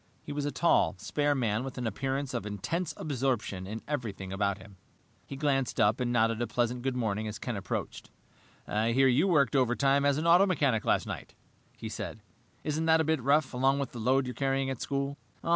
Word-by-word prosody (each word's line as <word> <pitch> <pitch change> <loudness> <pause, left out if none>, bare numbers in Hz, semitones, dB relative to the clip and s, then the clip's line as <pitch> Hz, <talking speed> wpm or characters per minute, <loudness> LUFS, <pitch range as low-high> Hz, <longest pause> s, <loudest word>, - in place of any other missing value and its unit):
He - - -7
was 145 0 -2
a 145 - -1
tall, 170 -10 +3
spare 145 +9 0
man 115 -3 0
with 135 -1 -7
an 125 - -3
appearance 135 +3 -2
of 115 -4 -3
intense 155 - -2
absorption 125 - -2
in 110 +3 -6
everything 105 -10 -4
about 100 0 0
him. 95 0 -15 0.5
He 140 - -6
glanced 135 -3 0
up 105 -1 +3
and 125 -1 0
nodded 115 -1 +2
a 120 - 0
pleasant 120 0 -1
good 130 0 -1
morning 110 -3 -1
as 105 - -5
Ken 120 - -4
approached. 95 -2 -4 0.6
"I 110 +2 +1
hear 135 +2 +5
you 135 +9 +3
worked 145 -7 +3
overtime 135 +2 +3
as 140 -1 +3
an 155 - -2
auto 175 +4 +6
mechanic 140 - +1
last - - +2
night," - - -7 0.4
he - - -6
said. - - -6 0.4
"Isn't 155 +1 -1
that 160 0 +5
a - - +3
bit 160 -2 0
rough, 140 +2 +2
along 135 +2 +2
with 140 -1 -3
the 120 - -8
load 130 +4 +2
you're 125 - -4
carrying 135 0 0
at 130 - -5
school?" 140 0 -2
130 Hz, 210 wpm, -29 LUFS, 115-140 Hz, 0.6 s, auto